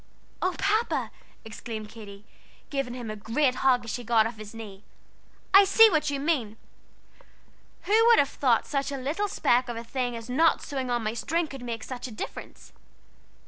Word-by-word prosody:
"Oh, 370 Hz, -1 st, 0 dB
Papa!" 430 Hz, +4 st, 0 dB, 0.3 s
exclaimed 220 Hz, -1 st, -7 dB
Katy, 210 Hz, -2 st, -12 dB, 0.5 s
giving 275 Hz, -4 st, -2 dB
him 240 Hz, -4 st, -6 dB
a -, -, -5 dB
great 250 Hz, +6 st, 0 dB
hug 250 Hz, -2 st, +3 dB
as 230 Hz, -, -4 dB
she 245 Hz, -, -4 dB
got 225 Hz, -1 st, +3 dB
off 225 Hz, 0 st, -5 dB
his 215 Hz, +1 st, -10 dB
knee, 210 Hz, -3 st, -10 dB, 0.7 s
"I 390 Hz, +1 st, +9 dB
see 435 Hz, +3 st, +6 dB
what 305 Hz, -2 st, +1 dB
you 280 Hz, -1 st, -2 dB
mean! 270 Hz, -8 st, -1 dB, 1.3 s
Who 440 Hz, +3 st, +4 dB
would 470 Hz, -1 st, +7 dB
have 280 Hz, -, +4 dB
thought 245 Hz, -5 st, +1 dB
such 275 Hz, -1 st, -2 dB
a 275 Hz, -, -3 dB
little 300 Hz, +11 st, -2 dB
speck 250 Hz, -9 st, +1 dB
of 235 Hz, -, -4 dB
a 230 Hz, -, -5 dB
thing 245 Hz, 0 st, -3 dB
as 230 Hz, 0 st, -8 dB
not 315 Hz, +6 st, +2 dB
sewing 265 Hz, -3 st, -4 dB
on 240 Hz, -1 st, 0 dB
my 215 Hz, 0 st, -2 dB
string 330 Hz, +8 st, -1 dB
could 270 Hz, -4 st, -9 dB
make 235 Hz, -2 st, -5 dB
a 255 Hz, -, -4 dB
difference? 215 Hz, -, -9 dB
250 Hz, 185 wpm, -27 LUFS, 225-300 Hz, 1.3 s, I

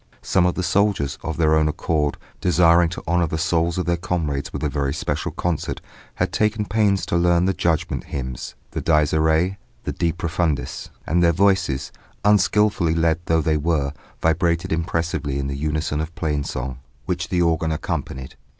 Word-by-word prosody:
Some 90 Hz, -1 st, +3 dB
of 90 Hz, -, 0 dB
the 90 Hz, -, -2 dB
soldiers, 95 Hz, -9 st, +1 dB
of 80 Hz, -2 st, -4 dB
their 80 Hz, -2 st, +3 dB
own 80 Hz, -1 st, +4 dB
accord, 75 Hz, -1 st, 0 dB, 0.2 s
desiring 85 Hz, -1 st, +4 dB
to 85 Hz, -, -7 dB
honour 85 Hz, 0 st, +2 dB
the 80 Hz, -, -2 dB
souls 85 Hz, 0 st, +1 dB
of 90 Hz, -, -1 dB
their 85 Hz, 0 st, +1 dB
comrades 80 Hz, -5 st, -2 dB
with -, -, -5 dB
a -, -, +2 dB
very 70 Hz, -1 st, -1 dB
special -, -, -2 dB
concert, 85 Hz, -3 st, -2 dB, 0.4 s
had -, -, -1 dB
taken 105 Hz, 0 st, +1 dB
pains 105 Hz, -2 st, +2 dB
to -, -, -1 dB
learn 85 Hz, 0 st, +3 dB
the 95 Hz, -, +2 dB
Judgment 85 Hz, -3 st, -1 dB
hymns, 65 Hz, -3 st, -5 dB, 0.2 s
the -, -, -3 dB
Dies 75 Hz, -2 st, +3 dB
iræ, 80 Hz, +4 st, +2 dB, 0.3 s
the -, -, -2 dB
De 85 Hz, -, 0 dB
profundis, 85 Hz, -3 st, -2 dB, 0.2 s
and 85 Hz, +3 st, +2 dB
their 85 Hz, -1 st, +5 dB
voices, 85 Hz, -7 st, +1 dB, 0.3 s
unskilfully 105 Hz, -3 st, +3 dB
led 80 Hz, 0 st, +2 dB
though 80 Hz, 0 st, +2 dB
they 80 Hz, 0 st, +1 dB
were, 75 Hz, -2 st, 0 dB, 0.3 s
vibrated 85 Hz, +1 st, +1 dB
impressively 80 Hz, -3 st, -1 dB
in 70 Hz, -, -2 dB
the 70 Hz, 0 st, -3 dB
unison 75 Hz, +1 st, -1 dB
of 80 Hz, +2 st, -6 dB
plain 75 Hz, -5 st, -1 dB
song, 65 Hz, -1 st, -4 dB, 0.3 s
which 85 Hz, -1 st, -2 dB
the 90 Hz, -1 st, +2 dB
organ 80 Hz, -1 st, +1 dB
accompanied. 65 Hz, -4 st, -4 dB
80 Hz, 175 wpm, -22 LUFS, 75-90 Hz, 0.4 s, their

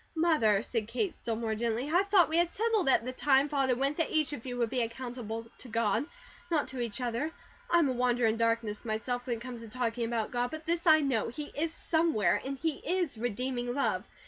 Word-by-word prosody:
"Mother," 265 Hz, -12 st, +3 dB
said 230 Hz, -3 st, -2 dB
Kate 255 Hz, -, -1 dB
still 230 Hz, -, -3 dB
more 225 Hz, -1 st, -2 dB
gently, 230 Hz, +3 st, -1 dB
"I 360 Hz, -, +6 dB
thought 395 Hz, -3 st, +4 dB
we 320 Hz, -, 0 dB
had 345 Hz, 0 st, +4 dB
it -, -, -21 dB
settled 440 Hz, -7 st, +1 dB
at 240 Hz, -, +3 dB
the 255 Hz, -, -2 dB
time 270 Hz, +2 st, +3 dB
Father 270 Hz, -3 st, +2 dB
went 275 Hz, +4 st, 0 dB
that 330 Hz, -, 0 dB
each 310 Hz, -2 st, +1 dB
of 255 Hz, -2 st, -7 dB
you 245 Hz, -1 st, -4 dB
would 235 Hz, -2 st, 0 dB
be 255 Hz, -2 st, +1 dB
accountable 230 Hz, -1 st, -4 dB
to -, -, -8 dB
GOD, 230 Hz, +3 st, 0 dB, 0.4 s
not 315 Hz, -4 st, +1 dB
to 260 Hz, -, -6 dB
each 235 Hz, -1 st, -2 dB
other. 245 Hz, +5 st, -1 dB, 0.4 s
I 345 Hz, -, +5 dB
am 330 Hz, -4 st, +4 dB
a -, -, +1 dB
wanderer 245 Hz, -1 st, +2 dB
in 220 Hz, -, +2 dB
darkness 230 Hz, -2 st, 0 dB
myself, 245 Hz, +3 st, -2 dB
when 240 Hz, -2 st, -1 dB
it -, -, -13 dB
come 250 Hz, 0 st, -6 dB
to 230 Hz, 0 st, -9 dB
talking 235 Hz, 0 st, -1 dB
about 230 Hz, -2 st, -2 dB
God, 245 Hz, 0 st, 0 dB
but 315 Hz, 0 st, -7 dB
this 340 Hz, +1 st, -1 dB
I 315 Hz, -1 st, +7 dB
know, 260 Hz, -7 st, +1 dB
He 290 Hz, +6 st, -6 dB
is 315 Hz, +2 st, 0 dB
SOMEWHERE 320 Hz, -, +1 dB
and 275 Hz, +1 st, -4 dB
He 315 Hz, 0 st, -2 dB
is 350 Hz, -9 st, -1 dB
REDEEMING 245 Hz, +2 st, -2 dB
love. 280 Hz, -, 0 dB
250 Hz, 235 wpm, -30 LUFS, 230-305 Hz, 0.4 s, I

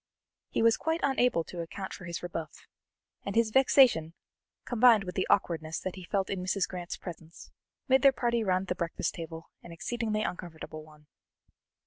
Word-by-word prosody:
He -, -, 0 dB
was 230 Hz, -1 st, +5 dB
quite 320 Hz, +1 st, -1 dB
unable 250 Hz, -10 st, +2 dB
to 175 Hz, -, -9 dB
account 190 Hz, +3 st, -6 dB
for 185 Hz, -, -9 dB
his 170 Hz, 0 st, -5 dB
rebuff, 165 Hz, -3 st, -6 dB, 0.6 s
and 200 Hz, -, -4 dB
his 230 Hz, -1 st, +3 dB
vexation, 245 Hz, -, +5 dB, 0.5 s
combined 235 Hz, -3 st, +5 dB
with 180 Hz, -1 st, -6 dB
the 185 Hz, -, -1 dB
awkwardness 160 Hz, -4 st, +1 dB
that 185 Hz, -, -4 dB
he 185 Hz, -, -9 dB
felt 195 Hz, +1 st, -1 dB
in 195 Hz, -2 st, -2 dB
Mrs. 185 Hz, 0 st, 0 dB
Grant's 180 Hz, -1 st, -6 dB
presence, 165 Hz, -2 st, -10 dB, 0.4 s
made 265 Hz, -1 st, +4 dB
their 275 Hz, 0 st, +7 dB
party 235 Hz, -3 st, 0 dB
round 185 Hz, -1 st, +1 dB
the 180 Hz, -, -1 dB
breakfast 170 Hz, -2 st, -2 dB
table 165 Hz, -1 st, -8 dB
an 170 Hz, -, -12 dB
exceedingly 215 Hz, +4 st, -2 dB
uncomfortable 160 Hz, -4 st, -6 dB
one. 150 Hz, -1 st, -18 dB
185 Hz, 170 wpm, -29 LUFS, 165-230 Hz, 0.6 s, their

